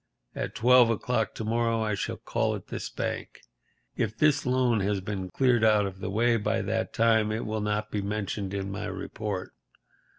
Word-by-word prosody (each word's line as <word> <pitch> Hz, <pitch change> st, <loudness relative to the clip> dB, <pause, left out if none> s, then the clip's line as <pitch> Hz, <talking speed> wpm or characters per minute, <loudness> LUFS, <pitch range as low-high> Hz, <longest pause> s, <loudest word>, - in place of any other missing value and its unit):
At -, -, -4 dB
twelve 125 Hz, 0 st, +6 dB
o'clock 115 Hz, 0 st, 0 dB
to -, -, -4 dB
morrow 115 Hz, 0 st, +1 dB
I 105 Hz, -1 st, 0 dB
shall 100 Hz, -, -3 dB
call -, -, -1 dB
at -, -, -10 dB
this -, -, -4 dB
bank. -, -, -4 dB, 0.6 s
If 110 Hz, -2 st, -2 dB
this 150 Hz, -3 st, +3 dB
loan 125 Hz, -3 st, +2 dB
has 100 Hz, 0 st, 0 dB
been 95 Hz, -1 st, -4 dB
cleared 120 Hz, +3 st, +2 dB
out 105 Hz, -2 st, +5 dB
of 95 Hz, -1 st, -6 dB
the -, -, -4 dB
way 115 Hz, +4 st, +2 dB
by 110 Hz, +1 st, 0 dB
that 110 Hz, +3 st, -1 dB
time 110 Hz, -1 st, +3 dB
it 110 Hz, +2 st, -2 dB
will 110 Hz, 0 st, -2 dB
not 105 Hz, 0 st, -1 dB
be 105 Hz, -, -1 dB
mentioned 100 Hz, -1 st, -3 dB
in 100 Hz, 0 st, -3 dB
my 95 Hz, -, -4 dB
report. 105 Hz, -4 st, -5 dB
110 Hz, 190 wpm, -28 LUFS, 100-115 Hz, 0.6 s, twelve